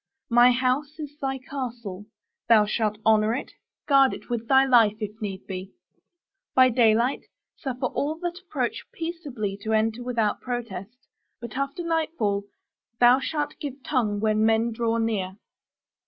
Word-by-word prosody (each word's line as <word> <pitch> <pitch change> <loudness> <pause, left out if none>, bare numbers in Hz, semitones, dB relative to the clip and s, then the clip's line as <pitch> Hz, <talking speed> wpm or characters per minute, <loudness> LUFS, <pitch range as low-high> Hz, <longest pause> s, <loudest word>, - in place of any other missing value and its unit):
My 240 +1 +7
house 255 +4 0
is 295 -2 -7
thy 270 -1 -1
castle; 240 -7 -6 0.4
thou 220 -2 +6
shalt 215 0 -1
honor 220 +1 +4
it; 270 - -5 0.4
guard 275 -2 +5
it - - -12
with 230 -1 -2
thy 265 +1 +5
life 230 -5 +5
if 210 -2 -3
need 195 -2 -5
be. 190 0 -7 0.8
By 255 0 +7
daylight, 235 +1 +2 0.3
suffer 260 -3 -4
all 290 +4 -1
that 350 0 -3
approach 280 -10 -3
peaceably 285 - -4
to 220 +1 -2
enter 220 +2 +1
without 235 -4 0
protest. 235 -2 -6 0.3
But 235 -1 -8
after 275 +6 -2
nightfall 315 -12 -1 0.5
thou 245 +2 +6
shalt 295 +1 -2
give 275 -2 -6
tongue 220 -7 0
when 215 0 +2
men 225 +1 +3
draw 230 0 0
near. 205 -4 -1
240 Hz, 145 wpm, -25 LUFS, 215-270 Hz, 0.8 s, My